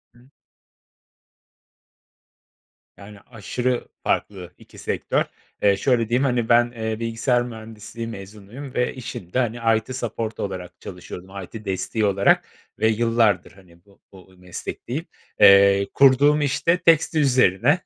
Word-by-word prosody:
Hımm. 125 +3 -22 2.7
Yani, 100 0 -13
aşırı 125 +2 -3 0.2
farklı 90 -3 -2
2 - - -18
sektör. - - -1 0.4
Eee, 100 -1 +4
şöyle 115 0 +1
diyeyim, 125 +3 +2
hani, 120 -4 0
ben, 120 0 +4
eee, 110 -2 -4
bilgisayar 115 +2 0
mühendisliği 110 -1 -8
mezunuyum 110 +5 -10
ve 125 - 0
işimde, 120 -5 -5
hani, 120 -2 -1 0.2
IT 130 - -9
support 115 -3 -4
olarak 90 -3 -6
çalışıyordum. 90 +1 -9
IT 110 +4 -10
desteği 100 +3 -1
olarak 100 -1 +3 0.3
ve 110 - +3
yıllardır, 110 -4 +1
hani, 85 -2 -21
bu 100 -1 -25
bu 95 -1 -17
meslekteyim. 120 - -6 0.3
Eee, 100 -1 +6
kurduğum 140 +2 +5
iş 140 0 -2
de 170 +2 +5
tekstil 165 -2 +3
üzerine, 130 - +3
115 Hz, 125 wpm, -22 LUFS, 100-125 Hz, 2.7 s, Eee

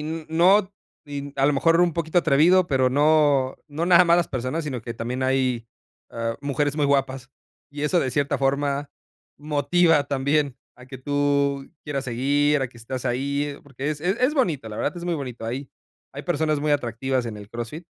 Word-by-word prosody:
n 160 +1 -5
no, 190 +5 +4 0.3
y 145 -1 -6
mm, 140 - -9
a 135 +1 +3
lo 145 - +3
mejor 165 +4 +3
un 175 -1 +3
poquito 165 +1 0
atrevido, 170 +4 +4
pero 130 -4 +2
no 145 -2 +3
no 160 +3 -3
nada 180 0 +7
más 170 0 +4
las 175 -2 +1
personas, 130 +5 -3
sino 130 -5 -4
que 115 +2 -7
también 125 +3 -4
hay, 130 -3 0 0.4
ah, 115 0 -3
mujeres 145 +1 -1
muy 145 -2 +2
guapas, 135 -2 0 0.4
y 145 0 -7
eso, 160 +4 +2
de 130 - -1
cierta 140 +1 0
forma, 140 +1 0 0.5
motiva 150 +2 +2
también 140 0 0 0.2
a 125 0 -14
que 130 -1 -9
tú 140 0 0 0.2
quieras 140 -3 -3
seguir, 140 +3 +1
a 130 - -2
que 120 - -17
estás 125 +2 -6
ahí, 140 +3 -1
porque 140 +1 -5
es 150 -1 -5
es 180 +6 0
es 255 +5 +2
bonito, 160 - 0
la 105 - -7
verdad 175 - -2
es 170 - -6
muy 175 -1 -1
bonito, 125 -6 -6
hay 130 +4 -4 0.4
hay - - -7
personas 155 -1 0
muy 150 0 +1
atractivas 130 -1 -1
en 110 -2 -6
el 105 0 -11
CrossFit 120 +10 -7
140 Hz, 195 wpm, -24 LUFS, 130-155 Hz, 0.5 s, nada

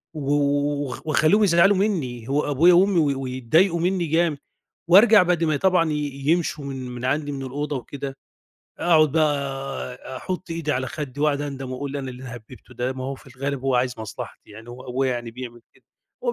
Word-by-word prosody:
و - - -5
و 145 0 +1
وخ 130 - -6
واخلّيهم 155 +7 +4
يزعلوا 190 +2 +5
منّي، 135 - -1
هو 145 +1 0
أبويا 165 +6 +5
وأمي 185 0 +4
وي 140 -3 +2
ويتضايقوا 135 +8 +1
منّي 180 0 0
جامد 160 -1 +1 0.5
وأرجع 205 +3 +8
بعد 175 -2 +1
ما 155 -1 +1
ي 145 - 0
طبعًا 180 -4 +2
ي - - -1 0.3
يمشوا 160 -3 +1
من 135 -1 -5
من 125 0 -7
عندي 145 +3 0
من 135 -1 -5
الأوضة 145 +3 -3
وكده، 135 +1 -6 0.6
أقعُد 155 -4 +4
بقى 155 -2 +3 0.6
أ 130 +1 -9
أحُط 185 +5 -5
إيدي 165 -2 -2
على 130 +1 -1
خدّي 145 -3 -6
وأقعُد 145 -1 +2
أندم 135 -3 -5
وأقول 140 +2 -4
أنا 135 -1 -4
إيه - - -8
اللي 125 +1 -11
هَبِّبته 120 +1 -11
ده؟ 125 +2 -2
ما 130 0 -6
هو 135 +1 -3
في 130 -1 -16
الغالب 140 0 -3
هو 135 -2 +1
عايز 125 0 +1
مصلحتي، 110 -1 -8
يعني 110 +3 -12
هو 125 +1 -10
أبويا 130 +1 0
يعني 120 -1 -5
بيعمل 120 0 -9
كده، - - -27 0.4
هو 485 - +1
145 Hz, 200 wpm, -23 LUFS, 130-165 Hz, 0.6 s, وأرجع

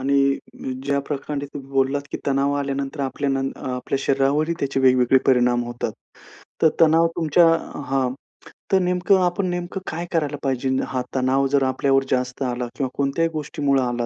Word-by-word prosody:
आणि 140 0 +2 0.5
ज्या 140 0 +1
प्रकरणे 145 0 -4
तुम्ही 135 -1 -8
बोललात, 135 +1 +1
की - - -3
तणाव 140 +1 +2
आल्यानंतर 140 +1 -3
आपल्या 140 +1 -1
न 135 0 0
अ, - - -6
आपल्या 125 +2 -2
शरीरावरही 140 +4 +1
त्याचे 135 -1 0
वेगवेगळे 130 0 +5
परिणाम 125 -2 +3
होतात. 120 0 -4 0.7
तर 160 - +7
तणाव 165 +1 +5
तुमच्या 165 0 +4 0.4
हां, 135 -2 0 0.6
तर 190 - +5
नेमकं 180 +1 +2
आपण 180 +2 0
नेमकं 175 +2 -4
काय 170 +2 -4
करायला 150 -4 0
पाहिजे? 135 -1 -1 0.2
हा 130 -1 -2
तणाव 130 +1 +2
जर 140 - +4
आपल्यावर 135 +1 +2
जास्त 125 +1 -1
आला 125 -1 -2
किंवा 135 -2 -1
कोणत्याही 140 +4 +1
गोष्टीमुळे 145 -3 0
आला 120 -1 -1
140 Hz, 160 wpm, -22 LUFS, 130-150 Hz, 0.7 s, तर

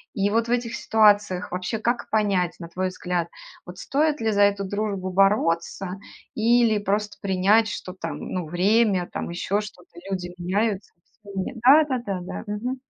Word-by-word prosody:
И 200 -2 +1
вот 230 +1 +1
в - - -3
этих 240 -1 -1
ситуациях 205 -4 +3
вообще 180 +4 -3
как 235 +2 -1
понять, 200 -5 +1
на 170 - -7
твой 185 +2 -2
взгляд, 180 -2 -3 0.4
вот 180 0 -10
стоит 300 +1 0
ли 225 -1 +1
за 205 -1 +2
эту 200 0 +2
дружбу 200 -2 -3
бороться 190 -1 +1 0.4
или 230 -1 +3
просто 205 +1 -2
принять, 200 +3 +3
что 185 -3 -6
там, 190 - -6
ну, 180 -4 -4
время, 190 +1 +2
там - - -4
еще 190 +4 -1
что-то, 210 - -11 0.2
люди 180 -2 -4
меняются, 200 +3 -1 0.3
всеми 200 +4 -5
Да 285 +5 +8
да 260 -3 -1
да 195 -2 -2
да. 175 - -6
Мгм. 245 +6 -3
200 Hz, 165 wpm, -24 LUFS, 185-220 Hz, 0.4 s, Да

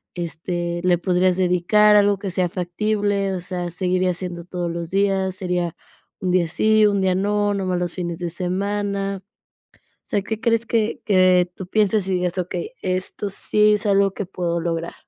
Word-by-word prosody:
este, 175 0 -3
le 180 -1 +3
podrías 180 0 +1
dedicar, 185 +4 +4
algo 205 -1 +4
que 195 -1 -4
sea 180 -1 0
factible, 200 +2 -1
o - - -3
sea, 180 -1 -4
seguiría 180 +1 0
siendo 175 -1 -6
todos 175 -1 -3
los 170 -1 -5
días, 195 -1 +1
sería 180 -3 -2 0.4
un 185 -1 -1
día 175 -2 +2
sí, 215 +4 +3
un 200 -1 +1
día 190 -1 +2
no, 205 +1 +1
nomás 185 -2 -1
los 175 -1 -3
fines 170 -2 -4
de 175 -1 -3
semana? 195 +2 -2 0.7
O - - -41
sea, 200 - +1
¿qué 220 +1 -4
crees 230 -1 +1
que 225 -1 0
que 185 -3 +4
tú 190 - -7
pienses 210 -2 +1
y 190 - 0
digas: 180 0 -1
"Okey, 185 - -3
esto 185 +2 -2
sí 210 +2 +3
es 210 - -2
algo 200 -1 +3
que 205 - -3
puedo 175 -2 -2
lograr"? 165 0 -3
185 Hz, 180 wpm, -22 LUFS, 175-200 Hz, 0.7 s, dedicar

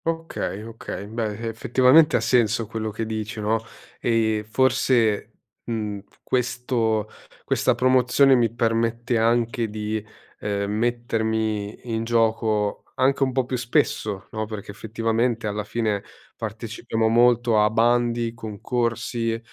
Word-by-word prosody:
Okay, 165 -10 -3
okay, 115 -3 -7
beh 110 +1 -3
effettivamente 130 +7 +4
ha - - +4
senso 115 -1 +2
quello 110 0 -4
che 110 +2 -4
dici, 110 0 -4
no, 110 +1 0 0.4
ehm, 110 -2 +1
forse, 120 -2 +2 0.3
mhmm, 105 -3 -3 0.2
questo 120 -3 0 0.4
questa - - +2
promozione 130 +1 +4
mi 120 -4 +3
permette 115 0 0
anche 115 0 +1
di, 105 0 -3 0.4
ehm, 100 -1 -2
mettermi 110 -1 -1
in 110 0 -1
gioco 110 -2 +1
anche 135 +2 +2
un 135 -1 +3
po' 130 0 0
più 125 0 -2
spesso, 110 -4 0
no, 110 0 -3
perché 105 -2 -7
effettivamente 115 +2 -1
alla 105 0 -2
fine 105 -1 -1 0.3
partecipiamo 110 0 -3
molto 120 -1 +4
a 105 - +4
bandi, 120 0 +2
concorsi 115 +1 -2
115 Hz, 120 wpm, -24 LUFS, 110-120 Hz, 0.4 s, effettivamente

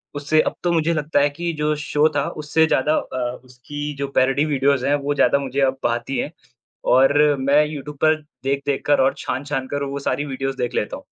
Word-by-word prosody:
उससे 145 +2 +2
अब - - -2
तो 175 - +1
मुझे 165 0 +1
लगता 150 -1 0
है 145 +1 +3
कि 170 +4 -4
जो 150 0 0
शो 150 +1 +3
था - - +1 0.2
उससे 160 +2 +3
ज़्यादा 150 +1 +2
अ, 125 -1 -3
उसकी 145 +4 -7
जो 140 0 -2
पैरॉडी 135 +3 +3
वीडियोज़ 140 -3 +1
हैं 140 - +2
वो 145 - +1
ज़्यादा 140 - +4
मुझे 135 0 -3
अब 135 -1 +2
भाती 120 +3 -1
हैं। 150 - -2 0.6
और 135 +2 +5 0.3
मैं 140 +3 +4
यूट्यूब 150 -1 -7
पर 155 0 +5 0.3
देख-देख 140 +1 -1
कर 145 -2 +3
और 130 - +3
छान-छान 135 0 -3
कर 145 0 -2
वो 140 0 -4
सारी 145 +1 -1
वीडियोज़ 135 -1 -4
देख 125 0 -2
लेता 105 - -2
हूँ। - - -15
140 Hz, 210 wpm, -21 LUFS, 135-150 Hz, 0.6 s, और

